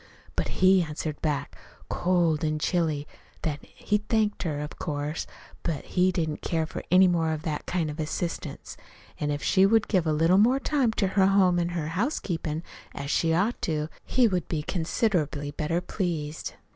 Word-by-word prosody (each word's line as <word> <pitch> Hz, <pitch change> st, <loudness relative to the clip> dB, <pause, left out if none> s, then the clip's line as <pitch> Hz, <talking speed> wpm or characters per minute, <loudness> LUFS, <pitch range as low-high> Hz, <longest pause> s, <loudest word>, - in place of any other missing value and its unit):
But -, -, 0 dB, 0.2 s
he 185 Hz, 0 st, +7 dB
answered 150 Hz, -1 st, -4 dB
back, 145 Hz, -2 st, -2 dB, 0.3 s
cold 175 Hz, -4 st, +1 dB
an' 155 Hz, -1 st, +1 dB
chilly, 155 Hz, -3 st, 0 dB, 0.4 s
that 145 Hz, -2 st, -2 dB
he 210 Hz, 0 st, -1 dB
thanked 215 Hz, 0 st, 0 dB
her, 155 Hz, -5 st, -2 dB
of 150 Hz, 0 st, -6 dB
course, 150 Hz, 0 st, -3 dB, 0.3 s
but 160 Hz, -5 st, -3 dB
he 185 Hz, 0 st, +2 dB
didn't 160 Hz, -4 st, -2 dB
care 160 Hz, -2 st, 0 dB
for -, -, -6 dB
any 185 Hz, +1 st, +7 dB
more 165 Hz, -2 st, +1 dB
of 155 Hz, 0 st, -5 dB
that 155 Hz, -2 st, -3 dB
kind 175 Hz, -3 st, 0 dB
of 150 Hz, +1 st, -6 dB
assistance; 160 Hz, +2 st, -4 dB, 0.4 s
an' 150 Hz, -, -1 dB
if 145 Hz, 0 st, -2 dB
she 190 Hz, -1 st, +4 dB
would 220 Hz, +2 st, +4 dB
give 180 Hz, -5 st, +1 dB
a -, -, +3 dB
little 165 Hz, +5 st, +4 dB
more 250 Hz, +6 st, +4 dB
time 275 Hz, -4 st, +1 dB
to 195 Hz, -4 st, +1 dB
her 190 Hz, 0 st, +4 dB
home 190 Hz, -3 st, +4 dB
an' 170 Hz, 0 st, 0 dB
her 155 Hz, -2 st, -2 dB
housekeepin', 170 Hz, -, -2 dB, 0.3 s
as 140 Hz, +1 st, -4 dB
she 165 Hz, -, +2 dB
ought 195 Hz, +9 st, +1 dB
to, 155 Hz, -2 st, -1 dB
he 250 Hz, -2 st, +3 dB
would 180 Hz, -5 st, -1 dB
be 155 Hz, -3 st, -2 dB
considerably 160 Hz, -, 0 dB
better 155 Hz, +4 st, -1 dB
pleased. 165 Hz, -5 st, -3 dB
165 Hz, 180 wpm, -27 LUFS, 155-190 Hz, 0.4 s, he